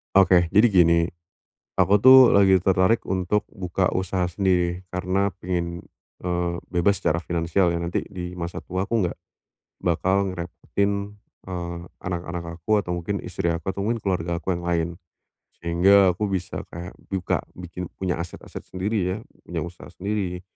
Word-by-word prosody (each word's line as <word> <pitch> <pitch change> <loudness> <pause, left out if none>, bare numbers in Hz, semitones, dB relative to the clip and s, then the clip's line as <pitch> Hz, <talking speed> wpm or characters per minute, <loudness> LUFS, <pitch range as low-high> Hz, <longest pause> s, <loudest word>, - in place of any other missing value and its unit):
Oke, 90 -3 +6
jadi 105 +4 +7
gini, 85 -3 +5 0.8
aku 100 +1 +4
tuh 130 -1 +9
lagi 95 -1 +6
tertarik 95 +4 +2
untuk 95 +2 0
buka 90 0 -2
usaha 95 -1 0
sendiri 90 -1 0
karena 95 +2 0
pengen, 85 -1 -3 0.3
eee, 90 -1 -1
bebas 95 +2 +2
secara 85 +3 0
finansial 85 +2 +1
ya 85 - -1
nanti 85 +1 -2
di 90 -1 -6
masa 85 -1 -5
tua 95 +1 -3
aku 110 +1 0
enggak - - -5 0.7
bakal 95 +3 +1
ngerepotin, 100 +3 -3 0.3
eee, 85 -1 -4 0.2
anak-anak 85 -1 -5
aku, 105 +5 +2
atau 90 -4 -1
mungkin 90 +4 -2
istri 90 -1 -2
aku, 85 +3 -2
atau 100 - -4
mungkin 115 +4 0
keluarga 85 -3 -1
aku 95 +2 -1
yang 85 - -4
lain. 85 -1 0 0.7
Sehingga 95 +3 +5
aku 95 +4 -1
bisa 95 -2 -3
kayak 85 +2 -8
buka 95 -2 -1 0.2
bikin 90 0 -7
punya 90 -3 -2
aset-aset 85 +1 -8
sendiri 100 +4 -2 0.2
ya, - - -4 0.3
punya - - -3
usaha 85 -2 -9
sendiri 90 0 -3
90 Hz, 150 wpm, -24 LUFS, 85-95 Hz, 0.8 s, tuh